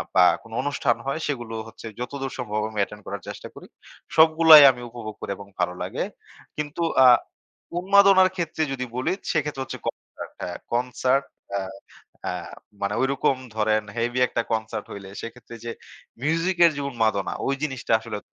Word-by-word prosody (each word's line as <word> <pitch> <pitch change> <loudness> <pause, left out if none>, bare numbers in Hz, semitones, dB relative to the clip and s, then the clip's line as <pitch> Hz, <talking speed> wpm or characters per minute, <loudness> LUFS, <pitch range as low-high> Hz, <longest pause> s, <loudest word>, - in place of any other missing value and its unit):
বা 90 - +7 0.2
কোন 115 - -16
অনুষ্ঠান 140 -4 +1
হয়, 140 - -1
সেগুলো 120 -6 -4
হচ্ছে 115 - -10
যতদূর 135 +2 -4
সম্ভব 105 -2 -2
আমি 110 -1 -5
অ্যাটেন্ড 105 0 -4
করার 100 0 -6
চেষ্টা - - -7
করি। - - -12 0.5
সবগুলাই 160 -1 +9
আমি 125 - -10
উপভোগ 115 -3 -8
করি, - - -4
এবং 100 - -11
ভালো 90 0 +1
লাগে - - -3 0.5
কিন্তু 150 +3 -3 0.2
আ - - +9 0.7
উন্মাদনার 195 0 +6
ক্ষেত্রে 160 -3 -2
যদি 130 -1 -3
বলি, 130 - 0 0.2
সেক্ষেত্রে 150 -3 -1
হচ্ছে - - -7
কনসার্ট - - -7
হ্যাঁ, 90 -1 -4 0.2
কনসার্ট 125 +3 +1 0.3
আ - - -2 0.7
আ - - -1 0.5
মানে 100 +1 0
ওইরকম 135 0 +2 0.2
ধরেন 110 0 +2
হেভি 120 +2 0
একটা - - -1
কনসার্ট 110 -1 -2
হইলে, 100 -1 -8
সেক্ষেত্রে 115 0 -9
যে 115 - -3 0.5
মিউজিকের 170 +2 +3
যে - - -2
উন্মাদনা 110 -6 0
ওই 135 - +1
জিনিসটা 135 -6 -1
আসলে 115 -2 -5
125 Hz, 155 wpm, -24 LUFS, 110-150 Hz, 0.7 s, সবগুলাই